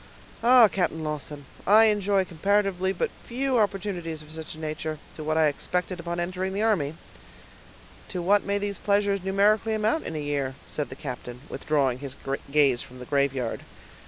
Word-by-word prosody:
Ah! 245 -1 +8
Captain 175 -5 -1
Lawton, 150 -1 -4 0.2
I 215 +3 +8
enjoy 205 -2 +2
comparatively 190 +1 +1
but 190 - -1 0.2
few 255 +1 +1
opportunities 180 -6 -2
of 150 - -15
such 160 -1 -7
a - - -13
nature, 155 0 -4 0.2
to 155 - -7
what 155 +1 0
I 160 - +5
expected 180 +4 -1
on 170 0 -2
entering 185 +2 -2
the 205 +2 0
army." 165 -10 +1 1.1
"To 185 - -4
what 200 +3 +4
may 200 0 0
these 200 0 -3
pleasures 200 -1 +1
numerically 210 +3 +3
amount 220 +9 0
in 160 - -5
a - - -2
year?" 145 -3 -2
said 150 - -3
the 130 - -8
captain, 125 -3 -7
withdrawing 140 -5 0
his 140 -1 -7 0.3
gaze 140 -4 +4
from 125 - -11
the 125 - -8
graveyard. 135 -3 0
175 Hz, 170 wpm, -26 LUFS, 150-200 Hz, 1.1 s, Ah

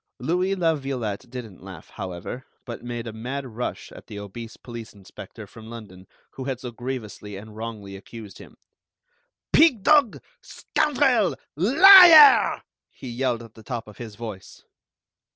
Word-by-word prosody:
Louis 180 +8 -1
La 165 -3 +1
Violette 130 -6 -5
didn't 120 -7 -10
laugh, 95 -4 -12
however, 95 +7 -8 0.2
but 120 -2 -8
made 120 -1 -6
a 115 - -7
mad 130 +5 -6
rush 125 0 -6
at - - -14
the 105 - -9
obese 105 +3 -9
police 120 -2 -10
inspector 100 -3 -12
from 110 0 -14
London, 100 -5 -12 0.2
who 130 - -8
had 130 -2 -4
so 125 -1 -8
grievously 115 -4 -7
and 105 +2 -12
wrongly 110 -3 -8
accused 100 0 -12
him. - - -15 1.0
"Pig 270 -11 +4
dog, 290 -5 +3 0.2
scoundrel, 265 - 0 0.2
liar!" 315 - +8 0.3
he 130 - -11
yelled 120 -1 -2
at 115 -2 -15
the 110 - -15
top 115 -1 -6
of 105 - -15
his 110 -3 -9
voice. 110 -4 -10
120 Hz, 150 wpm, -23 LUFS, 110-145 Hz, 1.0 s, liar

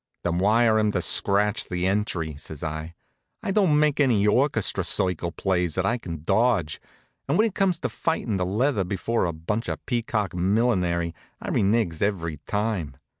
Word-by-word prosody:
"Then 85 0 0
wire 110 +3 +4
'em 105 -1 +2
to - - 0
scratch 105 +2 +2
the 90 0 -2
entry," 95 -6 -1
says 75 +1 -8
I. 80 +1 -5 0.5
"I 205 - -1
don't 185 -7 +3
make 150 -1 +2
any 120 -8 +3
orchestra 115 0 +2
circle 90 -2 +1
plays 90 -3 -1
that 95 - 0
I 120 +3 0
can 85 -7 -7
dodge, 95 -4 +1 0.5
and 145 - +1
when 220 - +4
it 220 - -2
comes 195 -4 +1
to - - 0
fightin' 125 -10 -2
the 90 - 0
leather 110 +2 +1
before 100 +5 -1
a 85 - -1
bunch 95 +8 -3
of - - -5
peacock 115 -5 -1
millinery 90 -3 +1 0.3
I - - -6
renigs 100 -5 +1
every 85 -6 -1
time. 105 - -2
100 Hz, 175 wpm, -25 LUFS, 85-115 Hz, 0.5 s, wire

